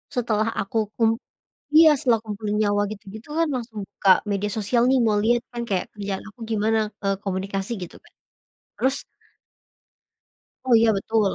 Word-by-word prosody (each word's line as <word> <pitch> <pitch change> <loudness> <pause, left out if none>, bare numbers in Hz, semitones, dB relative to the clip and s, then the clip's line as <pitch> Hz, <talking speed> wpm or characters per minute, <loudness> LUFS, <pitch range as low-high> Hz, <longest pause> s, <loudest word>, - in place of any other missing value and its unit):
setelah 220 -3 +1
aku 195 +3 -4 0.2
kum 225 -1 +3 0.7
iya, 320 0 +9
setelah 245 -5 +2
kumpulin 210 -1 -3
nyawa 205 -1 +2
gitu-gitu 215 +3 -11
kan 330 -1 +2
langsung 230 -4 -5
buka 195 - +1 0.2
media 205 +1 -1
sosial 220 +3 +1
nih 265 - +4
mau 215 -1 +2
lihat 240 +1 +3
kan 240 -1 -4
kayak 190 -4 0
kerjaan 200 -2 -4
aku 215 +3 -17
gimana, 220 +1 +1 0.3
eee, 195 0 +2
komunikasi 195 +1 -3
gitu, 175 - -8
Kak. - - -22 0.6
Terus 265 +1 +1 1.7
oh, 255 - +3
iya, 225 0 +5
betul. 210 +1 +1
215 Hz, 155 wpm, -23 LUFS, 200-235 Hz, 1.7 s, iya